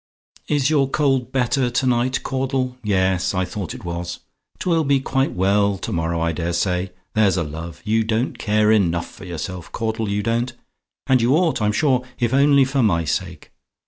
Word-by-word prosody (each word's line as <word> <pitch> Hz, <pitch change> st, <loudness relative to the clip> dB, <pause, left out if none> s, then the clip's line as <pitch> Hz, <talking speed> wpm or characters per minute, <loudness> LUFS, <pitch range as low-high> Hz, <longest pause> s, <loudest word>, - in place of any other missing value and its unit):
"Is 145 Hz, -1 st, +1 dB
your 140 Hz, -3 st, +3 dB
cold 135 Hz, -4 st, +1 dB
better 130 Hz, 0 st, +1 dB
to 125 Hz, +2 st, 0 dB
night, 125 Hz, +1 st, +1 dB
Caudle? 130 Hz, -1 st, -1 dB
Yes; 95 Hz, -2 st, +1 dB
I 95 Hz, 0 st, +1 dB
thought 90 Hz, -2 st, -5 dB
it -, -, -10 dB
was. 85 Hz, 0 st, -5 dB, 0.4 s
'Twill 165 Hz, -3 st, +1 dB
be 140 Hz, -1 st, +2 dB
quite 135 Hz, 0 st, 0 dB
well 100 Hz, +2 st, +2 dB
to -, -, -5 dB
morrow, 85 Hz, 0 st, -1 dB
I 85 Hz, 0 st, +1 dB
dare 85 Hz, +1 st, -3 dB
say. 90 Hz, +1 st, 0 dB, 0.2 s
There's 105 Hz, -4 st, +3 dB
a 85 Hz, -, +1 dB
love! 80 Hz, +2 st, -7 dB
You 110 Hz, +1 st, +2 dB
don't 110 Hz, +3 st, 0 dB
take -, -, -17 dB
care 105 Hz, 0 st, +2 dB
enough 85 Hz, -6 st, 0 dB
of 95 Hz, -, -8 dB
yourself, 85 Hz, +1 st, -6 dB
Caudle, 110 Hz, -1 st, -2 dB
you 100 Hz, 0 st, -1 dB
don't. 120 Hz, +2 st, -1 dB, 0.5 s
And 130 Hz, -2 st, +3 dB
you 120 Hz, +5 st, +3 dB
ought, 165 Hz, -7 st, +1 dB
I'm 105 Hz, 0 st, +2 dB
sure, 130 Hz, +1 st, +2 dB
if 120 Hz, -1 st, 0 dB
only 140 Hz, 0 st, +5 dB
for 135 Hz, +1 st, 0 dB
my 85 Hz, -8 st, +2 dB
sake. 75 Hz, -, -4 dB
110 Hz, 190 wpm, -21 LUFS, 90-130 Hz, 0.5 s, only